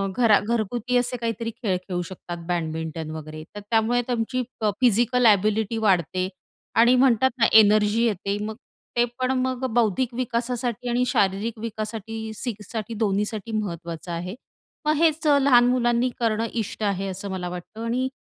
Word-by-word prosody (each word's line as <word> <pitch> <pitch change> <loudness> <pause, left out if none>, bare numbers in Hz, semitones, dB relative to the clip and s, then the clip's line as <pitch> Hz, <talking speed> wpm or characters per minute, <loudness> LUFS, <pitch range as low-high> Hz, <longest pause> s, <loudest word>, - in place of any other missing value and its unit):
घरा 225 -4 +5
घरगुती 235 +2 0
असे 245 0 0
काहीतरी 230 0 -3
खेळ 215 -5 -2
खेळू 180 -1 -4
शकतात, 175 -1 -7
बॅडमिंटन 160 -2 -3
वगैरे. 155 0 -7
तर - - -5
त्यामुळे 230 +2 +2
तुमची 245 +1 -1 0.2
प 215 - +3
फिजिकल 245 +1 +3
एबिलिटी 215 +1 +3
वाढते 185 -3 +1 0.5
आणि 240 +3 +6
म्हणतात 260 -1 +4
ना, 230 - +5
एनर्जी 215 0 +5
येते. 200 -2 -1
मग 220 - -5 0.4
ते 240 - +5
पण 255 0 +1
मग 260 0 -1
बौद्धिक 240 +1 +1
विकासासाठी 245 0 -2
आणि 245 +1 +2
शारीरिक 205 +3 0
विकासासाठी 220 0 -5
सी 240 +2 -3 0.2
साठी 225 0 -4
दोन्हीसाठी 210 +1 -1
महत्त्वाचं 170 -3 -5
आहे. 180 +4 -4 0.5
मग 305 - +3
हेच 315 -1 +2
अ, 285 - +6
लहान 250 -3 +6
मुलांनी 245 0 +2
करणं 225 -1 +1 0.2
इष्ट 215 - -7
आहे, 195 -1 0
असं 195 +1 -5
मला 180 -1 -3
वाटतं. 180 +5 -8
आणि 250 +3 0
220 Hz, 155 wpm, -24 LUFS, 195-240 Hz, 0.5 s, आणि